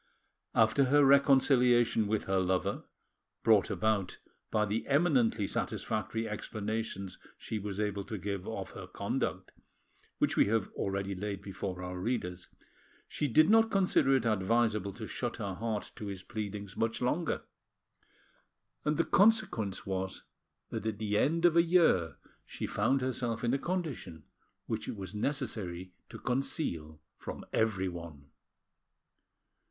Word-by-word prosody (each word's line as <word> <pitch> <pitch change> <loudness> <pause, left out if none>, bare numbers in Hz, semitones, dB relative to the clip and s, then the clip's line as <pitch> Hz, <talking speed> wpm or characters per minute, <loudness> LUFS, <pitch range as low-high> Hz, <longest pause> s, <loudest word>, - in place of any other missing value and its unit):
After 110 +5 +4
her 145 +2 +5
reconciliation 130 -5 +5
with 110 0 0
her 95 0 +1
lover, 95 -1 0 0.6
brought 110 -3 +5
about 100 -1 0 0.3
by 105 -1 +2
the 105 +2 -2
eminently 140 - +3
satisfactory 110 +3 -2
explanations 105 -2 -4 0.2
she 110 - -4
was 100 0 -5
able 100 -1 -1
to 110 - -5
give 100 -1 -4
of - - -5
her - - -8
conduct, - - -3 0.7
which - - +1
we - - +5
have 110 -2 +1
already 100 0 -2
laid 100 +1 -4
before 95 -2 -5
our 90 0 -5
readers, 90 -4 -3 0.6
she 150 - -1
did 155 +5 +5
not 225 +1 +5
consider 185 -9 +3
it 125 -3 +1
advisable 110 -1 +1
to 110 +2 -7
shut 120 +2 -4
her 100 -4 -3
heart 110 +1 -3
to 105 - -6
his 95 -2 -6
pleadings 105 -3 -5
much 115 0 -1
longer, 150 +7 0 1.4
and 150 0 +1
the 170 - +2
consequence 195 - +2
was 95 0 -3 0.5
that 110 - -3
at 110 -2 -2
the 105 -1 -1
end 165 +10 +2
of 170 -2 +5
a 170 - +7
year 160 - +3 0.3
she - - -5
found 135 0 +1
herself 120 -3 -2
in 120 +1 +2
a 140 - +1
condition 140 - -4 0.4
which - - -3
it - - -4
was 95 -2 -7
necessary 105 -8 -3 0.2
to - - -8
conceal 85 - -2 0.2
from - - -7
everyone. 85 -9 -2
110 Hz, 140 wpm, -31 LUFS, 95-130 Hz, 1.4 s, a